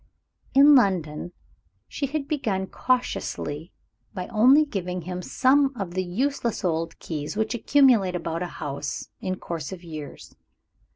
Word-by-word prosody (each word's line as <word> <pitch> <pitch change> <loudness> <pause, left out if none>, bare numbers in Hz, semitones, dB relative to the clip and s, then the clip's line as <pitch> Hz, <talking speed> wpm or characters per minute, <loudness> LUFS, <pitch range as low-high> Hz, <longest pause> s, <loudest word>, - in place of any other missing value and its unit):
In 285 +2 +8
London, 175 - +2 0.6
she 280 - -3
had 280 0 -3
begun 220 -11 -1
cautiously 180 - -2 0.4
by 180 -2 -3
only 255 +7 +6
giving 180 - -4
him 180 +1 -5
some 270 +7 +3
of 185 -3 -4
the 185 +1 0
useless 235 +4 -1
old 165 -1 -1
keys 150 +3 -5
which 220 +2 0
accumulate 240 -7 +4
about 165 -1 -3
a 180 - -2
house 145 -3 -5
in 185 0 -2
course 165 -4 -5
of 185 -2 -8
years. 155 -4 -9
185 Hz, 135 wpm, -25 LUFS, 170-255 Hz, 0.6 s, In